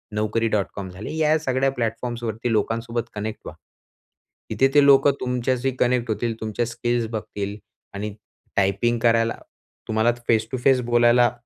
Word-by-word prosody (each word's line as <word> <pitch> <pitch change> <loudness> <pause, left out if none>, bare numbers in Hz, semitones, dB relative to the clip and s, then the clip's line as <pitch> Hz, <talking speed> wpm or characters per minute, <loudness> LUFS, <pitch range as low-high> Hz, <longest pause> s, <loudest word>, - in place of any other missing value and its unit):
naukari.com 105 -2 -1
झाले 95 +9 -7
या 155 0 +3
सगळ्या 135 -2 0
प्लॅटफॉर्म्सवरती 120 -1 -3
लोकांसोबत 115 +2 -1
कनेक्ट 110 +1 -4
व्हा. - - -8 0.9
तिथे 135 - +3
ते 145 - +7
लोकं 140 0 +6
तुमच्याशी 125 +1 0
कनेक्ट 125 -1 +1
होतील. 115 +1 -2
तुमच्या 110 +2 -1
स्किल्स 120 0 -1
बघतील 105 -2 -4 0.4
आणि 100 +1 -5 0.4
टायपिंग 100 +5 +2
करायला 115 -1 +3 0.5
तुम्हाला 110 +2 +2 0.2
फेस 110 -1 +2
टू 130 - -1
फेस 130 -2 +5
बोलायला 120 0 +5
115 Hz, 130 wpm, -23 LUFS, 110-125 Hz, 0.9 s, ते